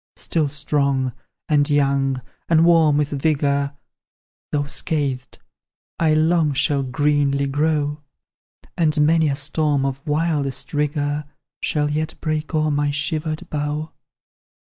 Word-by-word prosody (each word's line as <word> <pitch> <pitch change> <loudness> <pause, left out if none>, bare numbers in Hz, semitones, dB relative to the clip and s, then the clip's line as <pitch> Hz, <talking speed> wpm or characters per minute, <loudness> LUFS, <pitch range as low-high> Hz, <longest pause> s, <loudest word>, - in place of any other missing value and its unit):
"Still 155 -4 0
strong 140 -3 0 0.3
and 145 -1 +2
young, 135 -2 +1 0.3
and 165 0 +5
warm 165 -4 +5
with 150 -1 +1
vigour, 140 -1 0 0.8
Though 145 -1 0
scathed, 140 -4 -2 0.6
I 155 -2 +3
long 160 -1 +3
shall 140 +1 +1
greenly 140 +1 +1
grow; 150 +1 0 0.7
And 155 -3 +1
many 160 0 +3
a 140 - 0
storm 145 0 0
of 135 +1 -4
wildest 150 -3 -1
rigour 145 0 -1 0.4
Shall 150 -1 0
yet 155 +1 -2
break 155 +1 -2
o'er 155 0 +2
my 145 0 +1
shivered 155 +2 -2
bough. 150 +1 -2
145 Hz, 120 wpm, -21 LUFS, 140-155 Hz, 0.8 s, and